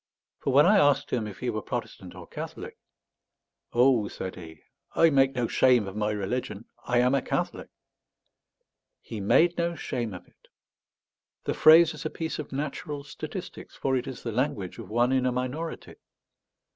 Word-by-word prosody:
For 140 - -1
when 140 +3 +6
I 200 +2 +6
asked 145 -5 +3
him 115 -3 -1
if 100 - -9
he - - -1
were - - -3
Protestant - - -6
or - - -10
Catholic - - -7 1.0
"Oh," 120 -3 +4
said 95 -2 -6
he, 80 -3 -12 0.3
"I 165 -1 +5
make 135 -1 +3
no 120 -2 0
shame 125 -5 +3
of 95 - -7
my 105 0 0
religion. 105 +1 -3 0.2
I 120 - 0
am 125 +2 +3
a 140 - +2
Catholic." - - -3 1.3
He 110 - -8
made 170 - +3
no 170 0 0
shame 120 - -4
of 90 - -11
it! - - -28 1.0
The - - -1
phrase 160 +1 +7
is 150 - -8
a 155 - -2
piece 160 0 -4
of 150 - -6
natural 145 +1 -4
statistics; 145 - -8
for 135 -1 0
it 125 - -2
is 130 - -7
the 115 - -3
language 110 -5 -2
of 110 -5 -9
one 120 +3 +2
in 130 -1 +2
a - - +1
minority. 130 +7 -4
125 Hz, 175 wpm, -27 LUFS, 110-145 Hz, 1.3 s, phrase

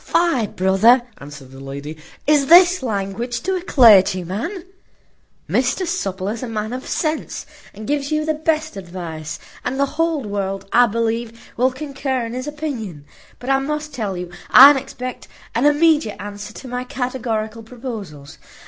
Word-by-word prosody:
"Fie, 335 -10 +1
brother," 195 +7 +4 0.2
answered 140 -2 -11
the 135 - -12
lady, 140 +3 -7 0.3
"is 290 -2 +3
this 355 +1 +7
language 230 +1 -3
to 380 +2 -1
a 365 - -2
clergyman? 220 - +3 0.8
Mr 255 +9 0
Supple 195 - -3
is 220 +2 -4
a 255 - -4
man 215 0 -4
of 255 +1 -6
sense, 310 -1 -2 0.3
and 215 +2 -10
gives 285 +2 -1
you 305 0 0
the 315 - +1
best 310 -2 -1
advice; 170 -4 -7 0.3
and 265 +2 -3
the 280 - +4 0.2
whole 325 -4 0
world, 195 -2 -3
I 245 0 +6
believe, 230 +1 -3
will 255 +2 +2
concur 270 -2 -3
in 230 - -6
his 255 +3 -5
opinion; 245 - -5 0.3
but 255 +2 -3
I 270 - +4
must 300 +2 -4
tell 205 -6 -3
you 175 0 -6 0.2
I 280 +3 +10
expect 255 -2 -7 0.3
an 245 +5 +3
immediate 295 -6 +3
answer 205 +1 -7
to 260 - -10
my 250 0 -3
categorical 235 -3 -3
proposals. 220 - -8
240 Hz, 155 wpm, -20 LUFS, 200-285 Hz, 0.8 s, I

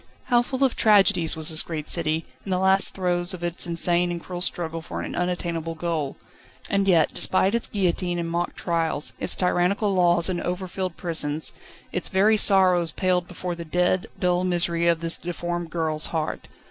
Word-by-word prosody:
How 240 -1 +5
full 260 +2 -2
of 265 - +2
tragedies 195 -6 +4
was 160 -1 +1
this 160 -1 +4
great 155 -3 -5
city, 160 -1 0 0.2
in - - -9
the 185 - +1
last 190 +1 +3
throes 180 0 0
of 175 - -10
its 175 0 -1
insane 175 +1 +2
and 175 -1 -3
cruel 175 +1 -7
struggle 165 -2 0
for - - -6
an - - -6
unattainable 170 -2 -2
goal. 160 -4 -3 0.5
And 195 0 +1
yet, 170 -4 +3
despite 190 +2 +1
its 235 - 0
guillotine 180 -3 -1
and 170 -1 -2
mock 170 +1 -2
trials, 165 -4 -1
its - - +1
tyrannical 185 +3 +1
laws 175 -2 +3
and 180 -2 -2
overfilled 185 0 -4
prisons, 160 -3 -2 0.4
its 180 - -1
very 205 +3 +3
sorrows 185 -5 +4
paled 180 +1 0
before 180 0 -5
the 170 0 -7
dead, 180 +2 0
dull 180 0 +1
misery 170 -1 +1
of 170 -1 +2
this 165 0 0
deformed 175 0 -4
girl's 160 -2 -1
heart. 160 -2 -3
175 Hz, 180 wpm, -24 LUFS, 165-185 Hz, 0.5 s, How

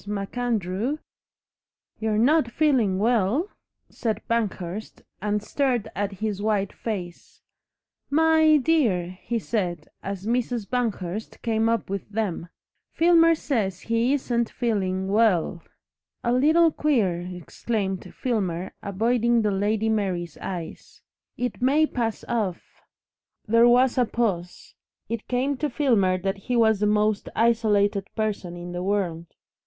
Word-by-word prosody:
MacAndrew 210 - -2 0.5
" - - -54
"You're 220 -1 0
not 260 +3 +3
feeling 240 -9 +2
WELL?" 230 - +1 0.4
said 220 -3 -3
Banghurst, 210 -3 -3 0.2
and 210 0 -1
stared 250 -2 0
at 200 +1 -2
his 205 0 -3
white 205 -2 0
face. 180 -6 -6 0.7
"My 315 +1 +5
dear!" 250 - +1
he 235 - -2
said, 180 -8 -3
as 195 0 -5
Mrs. 235 -2 -1
Banghurst 220 -5 -3
came 225 -1 +1
up 230 -2 0
with 195 +1 -5
them, 200 -5 -3 0.4
"Filmer 330 0 +5
says 210 - -2
he 230 +2 +1
isn't 240 -4 0
feeling 190 -5 -1
WELL." 195 -5 +2 0.6
"A 240 - +1
little 315 +6 +4
queer," 220 - +1
exclaimed 190 +2 -4
Filmer, 190 -8 -2
avoiding 230 +3 +1
the 210 - +1
Lady 205 +3 0
Mary's 185 -7 -1
eyes. 175 -4 -7 0.3
"It 245 -1 -3
may 285 +5 +4
pass 230 -6 -3
off 205 -7 -3 0.3
" - - -50
There 230 +2 +5
was 250 +1 +4
a 245 - +4
pause. 195 -7 -3 0.4
It 230 -1 -4
came 260 +3 0
to 300 +2 -1
Filmer 225 -10 +2
that 195 +2 -2
he 245 +6 -3
was 220 -3 +4
the 210 - +2
most 210 0 +1
isolated 210 -4 +2
person 205 -5 -2
in 175 0 -7
the 175 0 -4
world. 180 -4 -1
220 Hz, 130 wpm, -25 LUFS, 195-245 Hz, 0.7 s, My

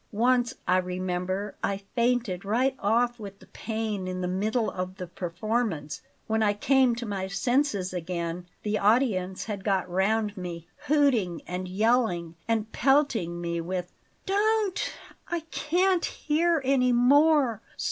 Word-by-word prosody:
Once, 245 +3 +2
I 185 - +4
remember, 185 +2 -2
I 200 0 -1
fainted 235 -6 +1
right 250 +7 +1
off 240 +3 +1
with 200 -2 -8
the - - -17
pain 220 -4 -4
in 185 0 -3
the 180 - -1
middle 215 +5 0
of 185 0 -4
the 185 - -6
performance 175 -2 -3 0.2
When 220 0 0
I 205 -1 +3
came 260 +3 +3
to 235 0 -5
my 195 -3 -3
senses 205 -1 0
again, 175 0 -4 0.2
the 210 0 0
audience 200 -4 +2
had 205 -3 -5
got 195 -3 +1
round 205 +3 +1
me 175 -3 -6 0.2
hooting 255 - +2
and 180 +1 -4
yelling 195 -4 +1
and 225 -1 0
pelting 240 - +2
me 170 -1 -2
with 180 +1 -4 0.2
" - - -40
"Don't! 415 0 +1 0.4
I 345 -1 -2
can't 360 +3 +1
hear 320 0 +1
any 255 -2 +3
more! 265 -1 +4
210 Hz, 145 wpm, -27 LUFS, 185-250 Hz, 0.4 s, I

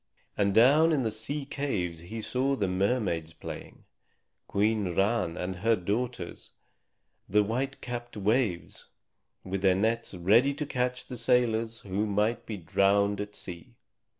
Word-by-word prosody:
And 100 -1 +2
down 145 +8 +6
in 145 -5 +2
the 110 - 0
sea 135 +7 -2
caves 100 - -2
he 110 +7 -7
saw 135 +4 0
the 100 -7 0
mermaids 90 -4 0
playing, - - -9 0.6
Queen 105 -3 +1
Ran 100 -4 +1
and 90 0 -3
her 115 +5 +3
daughters 105 +1 -3 0.8
the 105 +2 +4
white 130 +6 -2
capped 120 -2 -6
Waves, 105 -3 0 0.6
with 95 0 -3
their 95 -1 +4
nets 110 +1 0
ready 115 +11 +4
to 150 +1 -3
catch 125 -2 -2
the 125 - -7
sailors 115 -2 +1
who 100 +2 -2
might 105 +3 0
be 110 - -4
drowned 100 +3 +2
at 105 0 -7
sea. 90 +7 -9
110 Hz, 145 wpm, -29 LUFS, 95-125 Hz, 0.8 s, down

